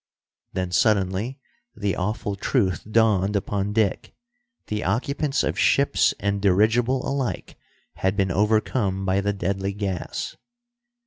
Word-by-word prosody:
Then 90 -1 -2
suddenly 100 +5 +1 0.4
the 100 -3 -1
awful 105 +2 -2
truth 100 -2 0
dawned 105 -3 +3
upon 100 0 -1
Dick. 105 -2 0 0.5
The 105 0 -3
occupants 135 - 0
of - - -1
ships - - +3
and 100 0 -1
dirigible 110 +6 +2
alike 135 -2 -3 0.4
had 95 +1 0
been 95 -3 +1
overcome 105 0 +1
by 95 +1 +2
the 100 +1 0
deadly 95 0 -2
gas. 95 -4 -4
100 Hz, 120 wpm, -24 LUFS, 95-110 Hz, 0.5 s, dawned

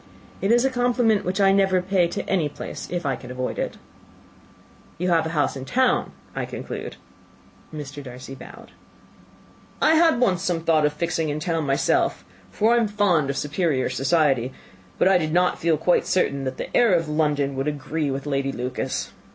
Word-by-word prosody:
"It 195 - +1
is 240 +2 +4
a 270 - +2
compliment 245 -4 +2
which 185 +3 -2
I 195 -1 +5
never 195 -1 +3
pay 180 -1 +1
to 170 - -5
any 170 -6 +1
place - - -7
if 175 -2 -3
I 135 -2 0
can 125 - -11
avoid 125 0 -4
it." - - -3 1.2
"You 180 +2 -1
have 165 -2 +2
a 160 -1 -4
house 145 -1 +1
in 135 - -6
town, 245 - +1 0.2
I - - -2
conclude?" - - -6 0.8
Mr. 145 -2 -7
Darcy 130 0 -9
bowed. 135 - -12 1.1
"I 315 - +4
had 325 -4 +4
once 185 -8 +2
some 170 -2 -1
thoughts 160 -2 +3
of 150 - -4
fixing 160 0 -1
in 145 +1 -2
town 160 -1 -1
myself, 135 0 +1 0.2
for 220 +3 +2
I - - +4
am 230 -2 +2
fond 195 -8 +1
of 140 - -2
superior 150 -4 0
society; 135 -2 +2 0.5
but - - +3
I 190 -1 +5
did 155 -2 -2
not 180 +1 +2
feel 165 -1 +2
quite 175 +3 +2
certain 140 -7 0
that 130 0 -4
the - - -6
air 235 -6 +5
of 165 -2 0
London 150 -2 0
would 135 +2 -2
agree 150 +1 -2
with 135 +1 -4
Lady 135 -1 -1
Lucas." 125 0 -3
160 Hz, 190 wpm, -23 LUFS, 140-190 Hz, 1.2 s, I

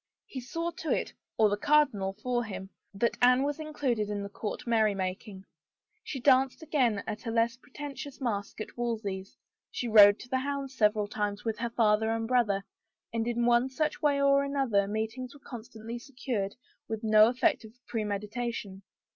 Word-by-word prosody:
He 260 - -7
saw 335 +7 -3
to 320 - -5
it - - 0
— - - -61
or 220 - +5
the 205 0 0
cardinal 220 -8 +2
for 245 -1 0
him 195 -3 -7
— - - -52
that 235 +4 0
Anne 250 +2 +5
was 290 +2 -2
included 270 -9 -1
in 205 -1 -3
the 200 - -6
court 210 +1 -5
menymaking. 200 -3 0 0.6
She 270 - -5
danced 265 +3 +3
again 250 -10 +1
at 215 +3 -6
a - - 0
less 230 +1 +1
pretentious 285 0 -8
masque 215 -7 -3
at - - -7
Wolsey's, 215 -5 -3 0.3
she 245 - -4
rode 205 -2 +8
to 245 +2 -4
hounds 275 0 -3
several 210 -2 +2
times 205 0 -3
with 225 -1 -2
her 235 0 -1
father 220 -1 +2
and 225 0 -1
brother, 215 -6 +2 0.5
and 230 0 -1
in 240 0 0
one 240 +2 +4
such 305 +3 -2
way 285 -2 +3
or 280 0 +4
another 265 -8 +1
meetings 225 +6 -4
were - - -14
constantly 230 -1 -8
secured 240 -6 -4 0.3
with 220 0 -4
no 215 0 +7
effect 250 +1 +1
of 220 0 -12
premeditation. 210 -1 -3
230 Hz, 175 wpm, -29 LUFS, 210-260 Hz, 0.6 s, rode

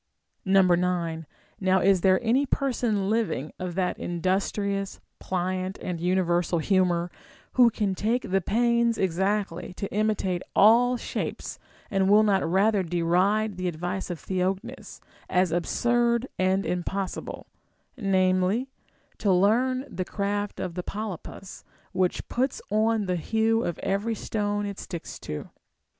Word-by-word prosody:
• - - 0 0.3
9. 170 -3 -1 0.3
Now 190 0 +3
is 190 0 +3
there 185 0 +4
any 255 +5 +2
person 240 -8 0
living 215 - -1
of 180 -2 -4
that 180 -1 -1
industrious, 195 +3 -1 0.2
pliant, 185 +1 -2
and 175 -2 -5
universal 175 -1 +1
humor, 175 0 +1 0.4
who 245 -2 +6
can 210 -3 -1
take 220 +3 -1
the 195 0 +3
pains 235 +3 +2
exactly 190 0 -1
to 200 - -4
imitate 205 -4 0
all 245 +4 +6
shapes, - - -5 0.3
and 195 -1 +2
will 210 +1 +6
not 200 -2 +3
ratlier 195 +4 +2
deride 185 +5 +1
the 185 0 -2
advice 175 +3 -3
of 175 - -3
Theognis 185 +2 -3 0.2
* - - -28
as 180 - -3
absurd 235 +7 +1
and 190 +1 +2
impossible, 185 +2 -3 0.5
namely, 190 +3 +1 0.5
to 205 - +2
learn 245 +8 +2
the 185 - -4
craft 205 +2 -3
of 180 - -3
the 180 - -3
polypus, 195 -1 -7 0.3
which 185 -1 0
puts 260 +2 -1
on 220 0 +2
the 180 -1 0
hue 225 +6 +1
of 175 - -2
every 205 +4 0
stone 205 -1 -2
it 200 -1 -5
sticks 170 -3 -7
to 75 - -6
195 Hz, 135 wpm, -26 LUFS, 180-215 Hz, 0.5 s, who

